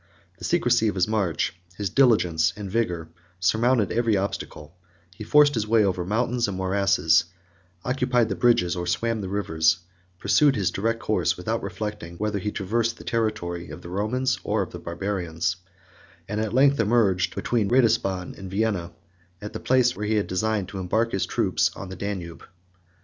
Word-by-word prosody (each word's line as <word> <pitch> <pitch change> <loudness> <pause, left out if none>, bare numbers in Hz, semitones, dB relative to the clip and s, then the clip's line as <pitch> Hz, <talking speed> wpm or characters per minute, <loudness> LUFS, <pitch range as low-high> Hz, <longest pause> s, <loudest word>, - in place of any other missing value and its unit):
The - - -6
secrecy 110 - +2
of 105 - -1
his 95 0 +2
march, 100 -7 0 0.2
his 100 -3 -2
diligence, 90 -11 +3
and 100 -3 -7
vigor, 90 -8 -1 0.3
surmounted 110 +4 +2
every 115 -3 +2
obstacle; 85 -4 -5 0.4
he 100 - -9
forced 145 +5 +5
his 110 -4 -1
way 110 -1 +4
over 90 -2 0
mountains 120 +5 0
and 100 -2 -4
morasses, 95 -4 +2 0.6
occupied 125 -2 +1
the 100 - -2
bridges 95 -3 +3
or 90 0 -4
swam 115 +5 0
the 95 - -5
rivers, 80 -6 +1 0.4
pursued 145 - +3
his 100 -5 0
direct 115 +3 -1
course, - - +1
30 - - -17
without - - -2
reflecting 105 -6 -5
whether 105 0 -1
he 105 - -2
traversed 115 +4 -1
the - - -11
territory 105 -7 -2
of - - -9
the 85 - -8
Romans 120 +8 -1
or 105 -1 0
of - - -9
the 85 - -7
Barbarians, 85 0 -3 0.7
and 105 +1 -2
at 110 -2 -2
length 135 +3 +4
emerged, 105 -5 +2
between 110 -5 0
Ratisbon 110 -7 +2
and 95 -1 -7
Vienna, 95 -4 -1 0.5
at 105 - -8
the - - -4
place 125 -1 +2
where 105 +1 -4
he 110 0 +2
designed 100 +1 -1
to 95 - -6
embark 110 +6 0
his 95 - -1
troops - - +1
on 95 - -8
the 95 - -7
Danube. 90 -4 -5
105 Hz, 175 wpm, -25 LUFS, 90-115 Hz, 0.7 s, forced